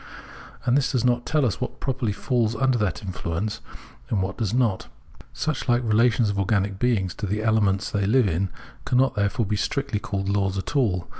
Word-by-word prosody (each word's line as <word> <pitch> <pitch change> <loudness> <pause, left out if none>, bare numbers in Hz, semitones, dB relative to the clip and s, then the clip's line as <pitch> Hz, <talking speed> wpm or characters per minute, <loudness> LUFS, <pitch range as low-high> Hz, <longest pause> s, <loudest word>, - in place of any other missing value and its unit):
And 125 - +3
this 140 0 +1
does 125 -2 +1
not 120 -1 +1
tell 155 -3 +2
us 110 - -1
what - - -4
properly 130 -5 -1
falls 115 +1 0
under 130 0 +2
that 95 -4 -1
influence 95 +2 -3 0.5
and 105 - +1
what 95 +1 -3
does 110 -5 -1
not. 115 -6 +1 0.4
Such 145 -2 -3
like 120 +1 +3
relations 115 0 +3
of 100 - -3
organic 100 -1 0
beings 100 -7 +1
to 105 - -4
the 105 +3 -1
ele 110 0 +3
ments 100 -1 0
they 100 -2 0
live 120 +1 +4
in 95 +2 0 0.3
cannot 130 +1 +2
therefore 105 +3 0
be 105 - -1
strictly 105 +1 -1
called 95 -1 -3
laws 100 -1 0
at 95 - -4
all. 100 -10 +1
110 Hz, 200 wpm, -24 LUFS, 100-125 Hz, 0.5 s, live